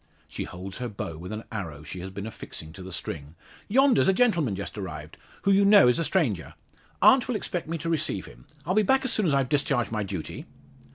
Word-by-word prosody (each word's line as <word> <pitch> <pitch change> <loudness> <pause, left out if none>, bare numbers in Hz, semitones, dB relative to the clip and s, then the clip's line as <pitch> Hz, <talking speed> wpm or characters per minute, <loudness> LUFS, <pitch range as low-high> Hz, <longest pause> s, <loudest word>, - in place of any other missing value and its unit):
She - - -5
holds 95 +4 -7
her 125 -1 -3
bow 100 -6 -5
with 90 +4 -7
an 110 +1 -5
arrow 85 -9 -5
she 90 - -7
had 95 +2 -8
been 100 +1 -4
affixing 80 -7 -8
to 95 - -10
the 95 +1 -8
string. 80 -3 -6 0.3
"Yonder's 265 0 +4
a 190 - +5
gentleman 175 - +2
just 100 - -5
arrived; 80 -7 -7 0.3
who 200 - +3
you 195 +1 +5
know 200 -6 +7
is 125 - +3
a - - +1
stranger. 135 - 0 0.5
Aunt 260 -2 +7
will 250 - -1
expect 175 -5 -3
me 165 +1 -2
to 160 +1 -5
receive 165 -3 -1
him. - - -15 0.2
I'll 180 - 0
be 215 - +5
back 265 +6 +2
soon 215 -6 +2
as 150 - +2
I've 135 -2 +2
discharged 140 -5 +1
my 110 -1 -1
duty." 95 -5 -5
120 Hz, 225 wpm, -27 LUFS, -, 0.5 s, know